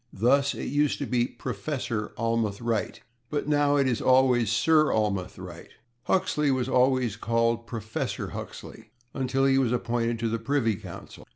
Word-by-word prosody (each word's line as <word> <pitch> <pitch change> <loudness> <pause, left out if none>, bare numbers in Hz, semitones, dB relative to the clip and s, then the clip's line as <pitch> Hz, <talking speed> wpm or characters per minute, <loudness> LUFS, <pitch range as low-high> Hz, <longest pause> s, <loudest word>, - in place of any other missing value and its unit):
Thus, 140 +7 +2
it - - -5
used 145 +1 +1
to 145 - -3
be 125 -2 +1
/Professor/ 115 -2 -3
Almroth 115 -3 -1
Wright, 115 -2 -2 0.3
but 145 -1 -2
now 145 -1 +3
it 140 -2 +3
is 120 -3 0
always 130 -3 +4
/Sir/ 155 +6 +3
Almroth 100 -4 -1
Wright. 90 -2 -10 0.4
Huxley 180 -6 +1
was 130 -2 0
always 125 -4 +2
called 115 +1 0
/Professor/ 110 -2 -4
Huxley - - -9 0.2
until 135 0 0
he 135 0 +4
was 125 -4 +1
appointed 120 -1 -1
to 115 0 -2
the 115 0 -1
Privy 115 -2 0
Council. - - -10
120 Hz, 160 wpm, -26 LUFS, 115-135 Hz, 0.4 s, always